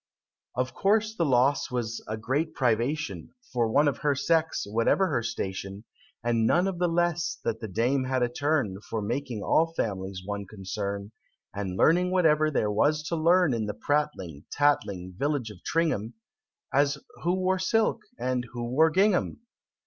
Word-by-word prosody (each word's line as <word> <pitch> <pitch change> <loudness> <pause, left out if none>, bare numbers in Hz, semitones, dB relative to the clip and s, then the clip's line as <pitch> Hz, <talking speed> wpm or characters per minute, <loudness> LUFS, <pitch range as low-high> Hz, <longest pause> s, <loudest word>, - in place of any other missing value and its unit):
Of 125 0 -1
course 215 - +2
the 170 -5 +1
loss 135 +2 +3
was 115 -3 -3
a 110 - -3
great 145 +8 -1
privation, 120 - -1 0.2
For 120 -2 +2
one 145 +5 +4
of 140 -4 0
her 145 -2 +1
sex 160 +3 +1
whatever 115 - +2
her 130 -7 0
station 100 -3 -4 0.4
And 115 -1 +2
none 175 +8 +3
the 180 - +2
less 175 -1 0
that 115 -1 -1
the 110 - -5
Dame 125 +7 +1
had 130 -1 0
a - - +3
turn 125 -6 -1
For 110 - -2
making 120 -1 -3
all 165 +1 +2
families 95 - -3
one 100 -1 -4
concern, 100 +1 -5 0.4
And 95 -2 -4
learning 180 - +4
whatever 155 -4 +3
there 105 -8 0
was 150 +9 +2
to 170 - 0
learn 165 -1 +4
In 110 -2 -1
the 105 - -4
prattling, 145 - -2
tattling 100 -11 +1
village 140 -6 -1
of 95 -3 -14
Tringham 140 -9 0 0.6
As 140 +1 +3 0.2
who 175 +2 +1
wore 185 0 +1
silk? 220 +4 +1 0.2
and 125 -1 -1
who 120 -1 -4
wore 160 +5 +5
gingham? 190 +5 +1
130 Hz, 165 wpm, -27 LUFS, 110-160 Hz, 0.6 s, wore